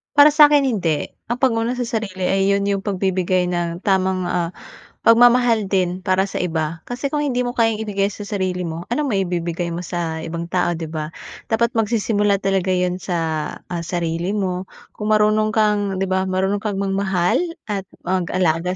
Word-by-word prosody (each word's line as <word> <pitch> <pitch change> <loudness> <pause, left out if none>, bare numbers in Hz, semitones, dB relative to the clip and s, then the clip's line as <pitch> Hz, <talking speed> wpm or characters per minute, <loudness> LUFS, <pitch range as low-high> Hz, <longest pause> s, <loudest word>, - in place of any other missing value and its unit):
Para 290 +1 +8
sa'kin 295 -1 +6
hindi. 180 - 0 0.2
Ang 240 - -1
pag-una 235 -1 +2
sa 250 - -2
sarili 215 -5 -3
ay 195 +1 +2
yun 200 0 +2
yung 200 0 0
pagbibigay 185 -2 0
ng 175 0 -2
tamang, 190 -2 +1
ah, 175 -1 -2 0.4
pagmamahal 235 -3 +4
din 185 -1 0
para 190 0 +2
sa - - -10
iba. 165 -2 -2
Kasi 245 +3 -4
kung 295 +1 -1
hindi 250 -3 0
mo 245 - -4
kayang 225 -2 +2
ibigay 205 -2 -1
sa 205 0 -8
sarili 185 -3 -2
mo, 165 +1 -5
anong 290 +4 0
maibibigay 175 -5 -1
mo 170 - -3
sa 170 -2 -3
ibang 165 +1 -5
tao, 175 - +1
'di 165 - -6
ba? 155 0 -5 0.3
Dapat 235 +1 +1
magsisimula 210 -2 +1
talaga 190 -1 +1
yun 180 0 0
sa, 180 -1 -3 0.6
ah, 175 - -2
sarili 170 +3 -2
mo 185 -2 -2 0.3
kung 215 +1 +2
marunong 215 0 +3
kang, 210 -2 +2
'di 190 - -1
ba, 190 0 +1
marunong 190 +2 0
kang 210 -1 -3
magmahal 195 -2 +1 0.3
at 195 -2 -3 0.2
mag-alaga 180 -1 0
190 Hz, 175 wpm, -20 LUFS, 180-215 Hz, 0.6 s, Para